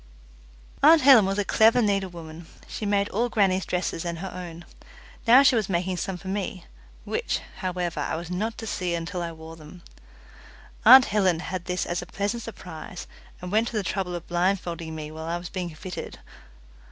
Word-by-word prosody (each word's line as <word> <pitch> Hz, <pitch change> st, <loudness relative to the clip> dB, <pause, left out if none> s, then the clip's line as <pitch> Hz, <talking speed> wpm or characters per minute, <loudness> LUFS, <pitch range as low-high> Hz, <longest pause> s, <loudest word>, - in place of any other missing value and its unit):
Aunt 310 Hz, +1 st, +7 dB
Helen 255 Hz, -8 st, +8 dB
was 195 Hz, +1 st, -1 dB
a 205 Hz, -, 0 dB
clever 225 Hz, +4 st, +4 dB
needlewoman. 175 Hz, -6 st, -2 dB, 0.2 s
She 210 Hz, -, -5 dB
made 200 Hz, 0 st, +2 dB
all 235 Hz, +4 st, 0 dB
grannie's 190 Hz, -4 st, +1 dB
dresses 180 Hz, -2 st, -2 dB
and 170 Hz, -1 st, -4 dB
her 190 Hz, +2 st, -6 dB
own. 175 Hz, -2 st, -8 dB, 0.6 s
Now 250 Hz, +4 st, +8 dB
she 270 Hz, -, +5 dB
was 215 Hz, -4 st, 0 dB
making 180 Hz, 0 st, -1 dB
some 185 Hz, +1 st, -3 dB
for 190 Hz, +1 st, -12 dB
me, 190 Hz, -1 st, -4 dB, 0.4 s
which, 470 Hz, +1 st, -2 dB, 0.2 s
however, 180 Hz, -4 st, -3 dB
I 145 Hz, -, -2 dB
was 170 Hz, +2 st, -6 dB
not 215 Hz, +5 st, -2 dB
to 225 Hz, -, -6 dB
see 180 Hz, -5 st, -2 dB
until 175 Hz, +2 st, -4 dB
I 170 Hz, -1 st, -3 dB
wore 160 Hz, 0 st, -11 dB
them. 165 Hz, +2 st, -14 dB, 1.0 s
Aunt 255 Hz, +3 st, +10 dB
Helen 190 Hz, -5 st, +1 dB
had 180 Hz, 0 st, -5 dB
this 180 Hz, 0 st, -2 dB
as 175 Hz, 0 st, -2 dB
a 175 Hz, -, -9 dB
pleasant 205 Hz, +5 st, -3 dB
surprise, 180 Hz, -6 st, -9 dB, 0.4 s
and 180 Hz, -, -5 dB
went 220 Hz, +3 st, +2 dB
to 225 Hz, -, -3 dB
the 210 Hz, -, 0 dB
trouble 180 Hz, -1 st, -2 dB
of 170 Hz, -, -6 dB
blindfolding 175 Hz, -2 st, -1 dB
me 155 Hz, -1 st, -6 dB
while 160 Hz, 0 st, -7 dB
I 170 Hz, +1 st, -2 dB
was 175 Hz, 0 st, -8 dB
being 180 Hz, -2 st, -4 dB
fitted. 180 Hz, +3 st, -7 dB
185 Hz, 190 wpm, -25 LUFS, 170-205 Hz, 1.0 s, Aunt